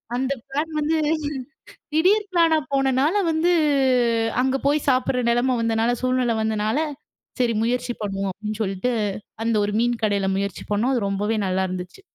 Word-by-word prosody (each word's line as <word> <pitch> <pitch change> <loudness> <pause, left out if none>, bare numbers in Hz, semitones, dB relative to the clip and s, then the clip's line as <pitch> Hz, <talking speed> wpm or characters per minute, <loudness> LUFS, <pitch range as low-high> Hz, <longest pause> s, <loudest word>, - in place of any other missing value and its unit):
அந்த 265 +2 0 0.2
பிளான் 300 +4 -2
வந்து 315 +2 +1 1.0
திடீர் 400 +6 +3
பிளானா 330 -2 +4 0.2
போனனால 270 +5 +2 0.2
வந்து, 335 +3 +2 0.9
அங்க 265 +1 +1
போய் 290 +1 +1
சாப்பிடுற 255 -1 +1
நெலைமை 250 +2 +2
வந்தனால, 230 +1 +1
சூழ்நிலை 255 -2 +1
வந்தனால, 220 +3 0 0.6
"சரி 235 -2 +2
முயற்சி 245 +1 -1
பண்ணுவோம்." 195 -1 -2
அப்படீன்னு 215 +2 -5
சொல்ட்டு, 195 +5 -1 0.5
அந்த 230 - +1
ஒரு 205 - -3
மீன் 240 -1 0
கடையில 200 -2 +1
முயற்சி 200 -2 -3
பண்ணோம். 240 +6 +1
அது 205 -5 0
ரொம்பவே 210 +3 -1
நல்லாயிருந்துச்சு. 185 - -3
240 Hz, 140 wpm, -23 LUFS, 210-270 Hz, 1.0 s, பிளானா